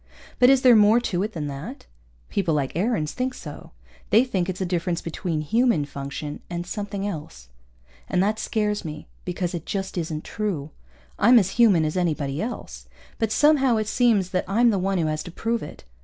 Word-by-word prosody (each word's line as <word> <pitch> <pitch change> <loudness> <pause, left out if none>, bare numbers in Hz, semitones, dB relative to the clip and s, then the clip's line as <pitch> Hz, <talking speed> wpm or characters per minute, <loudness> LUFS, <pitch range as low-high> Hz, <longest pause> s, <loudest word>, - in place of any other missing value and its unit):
But 250 0 +7
is 270 -1 +4
there 250 -2 +8
more 215 +2 +6
to 185 -7 -2
it 215 +2 -2
than 155 -3 -4
that? 145 - -7 0.4
People 170 -6 0
like 140 -2 -2
Aarons 180 -5 0
think 255 0 -3
so. 150 -2 -9 0.4
They 220 +5 +6
think 190 -8 -1
it's 185 - -4
a 190 - -1
difference 175 -1 -1
between 165 -1 -3
human 225 - +2
function 140 +1 -6
and 175 0 -4
something 200 +1 -4
else. 150 - -7 0.6
And - - -1
that 215 +2 0
scares 210 -2 -1
me 155 -1 -7 0.2
because 180 0 -2
it 170 -3 -4
just 190 -2 -3
isn't 160 -2 -4
true. 175 -9 -3 0.5
I'm 240 +3 +7
as 195 -4 +3
human 205 -9 +4
as 155 - -2
anybody 150 -5 -1
else. - - -6 0.3
But 225 -2 0
somehow 270 -2 +4
it 215 - 0
seems 215 -6 +2
that 185 - 0
I'm 230 +5 +4
the 200 - 0
one 195 +1 0
who 165 - +1
has 155 0 -1
to 175 - -8
prove 230 +6 -2
it. - - -9
185 Hz, 195 wpm, -24 LUFS, 155-220 Hz, 0.6 s, there